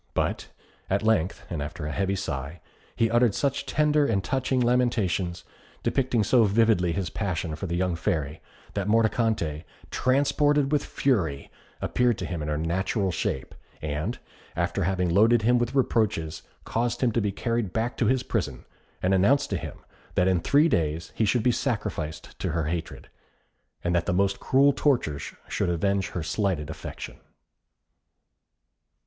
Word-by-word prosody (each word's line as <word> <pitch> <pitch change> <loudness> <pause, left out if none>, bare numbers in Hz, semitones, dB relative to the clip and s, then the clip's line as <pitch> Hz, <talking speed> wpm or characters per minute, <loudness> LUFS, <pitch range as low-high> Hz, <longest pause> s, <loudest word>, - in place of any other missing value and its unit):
But, - - -1 0.4
at 100 +2 +1
length, 100 -5 +1
after 75 -1 -4
a 75 - -3
heavy 95 +3 0
sigh, 80 -4 -4 0.4
he 115 -1 +2
uttered 120 -3 +3
such 140 0 -1
tender 150 +1 +3
and 100 -4 0
touching 130 0 0
lamentations, 115 -8 +1 0.4
depicting 125 -4 +1
so 115 +3 +4
vividly 105 -4 +3
his 90 0 -2
passion 90 -6 -2
for 95 - -5
the 85 - -2
young 90 -1 0
Fairy, 80 -3 -2 0.3
that 100 -1 -2
Mordicante, 110 -8 +1 0.3
transported 145 +2 +2
with 150 -2 +2
fury, 85 - -1 0.3
appeared 125 -3 +1
to - - -4
him 85 -3 -4
in 75 - -3
her 75 -1 -1
natural 95 +4 0
shape; 65 -5 -3 0.3
and, 75 +9 -3 0.4
after 85 +2 0
having 95 -1 +1
loaded 110 +6 +4
him 120 +2 +4
with 120 +3 -1
reproaches, 95 - +1 0.2
caused 120 +1 -1
him 125 -2 +3
to 115 - +1
be 105 -1 0
carried 115 -1 -1
back 115 +4 -1
to 115 - +2
his 130 +2 +2
prison, 75 - -3 0.4
and 95 +1 +3
announced 100 +10 +3
to - - +1
him - - -7 0.4
that 90 -1 +3
in 95 -2 +3
three 145 - +4
days 80 - -1
he 110 - +1
should 105 +2 +2
be 125 - +4
sacrificed 105 - -3
to - - -2
her 85 -1 0
hatred, 85 +1 -4 0.8
and 85 - 0
that 85 -1 +1
the - - +1
most 100 +2 +1
cruel 140 +2 +4
tortures 115 - 0
should - - -1
avenge 95 +3 +1
her 85 - -4
slighted 85 -3 -1
affection. - - -8
100 Hz, 160 wpm, -26 LUFS, 85-120 Hz, 0.8 s, so